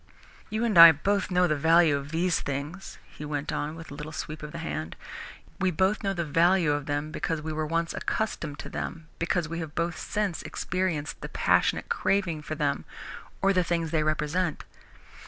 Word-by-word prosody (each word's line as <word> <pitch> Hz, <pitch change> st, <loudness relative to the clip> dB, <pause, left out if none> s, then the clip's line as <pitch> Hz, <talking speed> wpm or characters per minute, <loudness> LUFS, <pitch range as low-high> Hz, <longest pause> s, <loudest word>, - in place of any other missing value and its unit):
"You 220 Hz, +2 st, -1 dB
and 210 Hz, -7 st, +3 dB
I 165 Hz, 0 st, +13 dB
both 195 Hz, +6 st, 0 dB
know 180 Hz, -1 st, +3 dB
the 155 Hz, -3 st, +1 dB
value 160 Hz, +1 st, +5 dB
of 140 Hz, 0 st, -5 dB
these 170 Hz, +2 st, +1 dB
things," 145 Hz, +7 st, -5 dB
he -, -, -11 dB
went 150 Hz, -1 st, -3 dB
on, 150 Hz, +2 st, -3 dB
with 165 Hz, -2 st, -10 dB
a -, -, -6 dB
little 150 Hz, +2 st, -7 dB
sweep 155 Hz, 0 st, -6 dB
of 150 Hz, 0 st, -7 dB
the 170 Hz, -, -7 dB
hand. 120 Hz, -, -4 dB, 0.6 s
"We 185 Hz, -, +2 dB
know 190 Hz, +4 st, +2 dB, 0.2 s
the 170 Hz, -1 st, -1 dB
value 170 Hz, +1 st, +3 dB
of 145 Hz, -1 st, -2 dB
them 145 Hz, +1 st, -2 dB
because 160 Hz, 0 st, -2 dB
we 155 Hz, +1 st, -4 dB
were 155 Hz, 0 st, -2 dB
once 165 Hz, +1 st, -1 dB
accustomed 155 Hz, -9 st, -2 dB
to -, -, -8 dB
them, 160 Hz, -1 st, -6 dB
because 170 Hz, -1 st, 0 dB
we 165 Hz, +2 st, -4 dB
have 160 Hz, -2 st, -6 dB
both 170 Hz, -1 st, -1 dB
since 205 Hz, -5 st, -2 dB
experienced 175 Hz, -5 st, -3 dB
the -, -, -6 dB
passionate -, -, +2 dB
craving 180 Hz, -6 st, 0 dB
for 155 Hz, +1 st, -5 dB
them 145 Hz, -2 st, -1 dB, 0.6 s
or 195 Hz, 0 st, +4 dB
the 185 Hz, -1 st, +3 dB
things 165 Hz, -2 st, -1 dB
they 160 Hz, -2 st, +2 dB
represent. 155 Hz, +2 st, -1 dB
165 Hz, 190 wpm, -27 LUFS, 150-180 Hz, 0.6 s, I